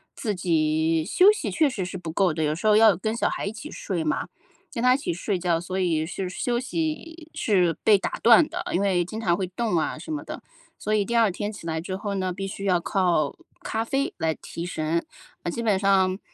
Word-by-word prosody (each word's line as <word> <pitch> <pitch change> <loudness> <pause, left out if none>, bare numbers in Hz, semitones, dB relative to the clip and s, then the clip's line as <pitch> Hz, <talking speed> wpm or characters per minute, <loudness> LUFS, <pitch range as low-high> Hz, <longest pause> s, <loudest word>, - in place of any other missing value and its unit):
自 215 -6 -2
己 160 -2 +1
休 370 - +5
息 425 - -3
确 310 - +2
实 220 -9 -3
是 185 +1 -5
不 165 -3 -6
够 185 0 +2
的。 155 0 -2
有 150 0 +1
时 180 +7 -2
候 210 - +6
要 215 -3 +6
跟 215 +6 -2
小 - - +1
孩 - - -3
一 - - -2
起 300 +7 -9
睡 175 -5 -3
嘛， 155 - -1 0.4
跟 230 - -3
她 250 0 +6
一 - - +2
起 - - -2
睡 180 +2 -2
觉， 170 -2 +1
所 185 +2 -5
以 160 -4 +1
是 185 +1 -4
休 240 +6 -1
息 320 +3 -4
是 180 -6 +2
被 210 -2 +6
打 - - -4
断 235 +6 +7
的， 360 +2 -5
因 180 - +1
为 185 -3 +2
经 215 +6 -6
常 175 -6 +2
会 190 -1 -2
动 210 +1 -2
啊 - - -2
什 320 - -8
么 300 - -4
的， - - -8 0.3
所 215 - -2
以 210 -1 +3
第 235 +3 -3
2 225 -4 +4
天 205 +4 -4
起 200 - -11
来 160 -1 -2
之 185 +2 -4
后 200 0 -4
呢， 185 -1 -1
必 195 +2 -5
须 200 0 -6
要 180 -3 +3
靠 170 -5 +1 0.3
咖 220 +1 -1
啡 275 +4 -1
来 160 -1 0
提 170 - -7
神。 165 -1 -1 0.4
嗯， 175 - -2
基 235 - -4
本 205 -4 +2
上 190 -1 +3
190 Hz, 255 characters per minute, -25 LUFS, 170-225 Hz, 0.4 s, 断